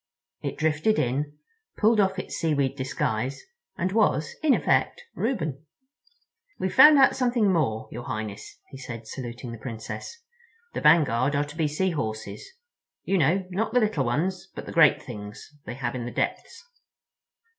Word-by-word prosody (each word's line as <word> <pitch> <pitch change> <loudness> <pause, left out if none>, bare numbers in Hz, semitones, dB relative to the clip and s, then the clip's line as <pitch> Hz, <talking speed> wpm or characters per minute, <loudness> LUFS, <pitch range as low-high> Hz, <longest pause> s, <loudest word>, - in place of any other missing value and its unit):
It - - -4
drifted 160 +8 +1
in, 145 +4 -1 0.4
pulled 220 +1 +3
off 190 -1 +2
its 185 - -5
seaweed 140 -5 0
disguise, 130 -1 -2 0.3
and 185 +2 -1
was, 175 - +1
in 300 -4 +4
effect, 485 - +1
Reuben. 160 - -2 0.9
"We've - - -2
found 300 0 +9
out 270 - +5
something 240 -6 +2
more, 115 -10 0
your 120 +1 -7
Highness," 110 -2 -6
he 135 - -9
said, 120 -3 -8
saluting 120 +1 -7
the 115 - -8
Princess. 115 - -7 0.5
"The - - -3
vanguard 145 -4 +4
are 145 +1 +1
to 145 +1 -11
be 160 -2 +1
Sea 180 +6 0
Horses; 110 -8 -5 0.5
you 195 - +1
know, 175 +6 +2
not 220 +5 -1
the - - +6
little 210 - +1
ones, 180 +11 -1
but - - -7
the - - -7
great 165 -3 +5
things 105 +1 -9 0.2
they - - -5
have 120 -3 -3
in 125 -2 -4
the 120 - -5
depths." - - -3
145 Hz, 160 wpm, -26 LUFS, 120-190 Hz, 0.9 s, found